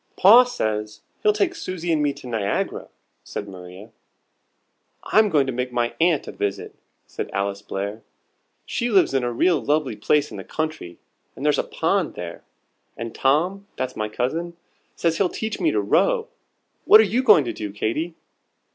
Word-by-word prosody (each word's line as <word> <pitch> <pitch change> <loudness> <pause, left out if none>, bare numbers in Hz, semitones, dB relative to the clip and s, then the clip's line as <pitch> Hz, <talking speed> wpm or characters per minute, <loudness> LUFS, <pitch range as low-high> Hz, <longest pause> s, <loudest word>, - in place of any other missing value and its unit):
"Pa 230 +7 +8
says 110 - -3 0.2
he'll 425 - +4
take 395 -4 0
Susie 185 - -3
and 155 - +1
me 145 -1 +2
to 140 -1 -12
Niagara," 110 -5 -2 0.4
said 105 - -6
Maria. 95 +3 -11 1.1
"I'm 215 0 +3
going 145 -6 +3
to 130 - -3
make 125 +1 -3
my 120 -1 -1
aunt 165 -4 +2
a - - -5
visit," 100 -1 -4 0.3
said - - -6
Alice 100 0 -2
Blair. 100 +2 -5 0.6
"She 240 - -2
lives 195 -9 +3
in 135 -2 +1
a 120 - -1
real 155 +5 +2
lovely 145 -3 0
place 145 +8 +1
in - - -7
the - - -7
country, 155 - -5 0.4
and 140 - -6
there's 150 - +3
a - - +1
pond - - -1
there; - - -7 0.5
and 115 -1 -6
Tom 180 +9 +1
(that's 130 0 -4
my 110 0 -3
cousin) 165 +10 -3 0.4
says 165 -1 0
he'll 190 -3 +2
teach 220 +3 -4
me 325 - +2
to - - +1
row. - - +2 0.6
What 215 - +9
are - - +7
you 220 +5 +1
going 210 - +6
to 120 - -3
do, 105 -2 -5
Katy?" 135 +11 -2
145 Hz, 175 wpm, -23 LUFS, -, 1.1 s, What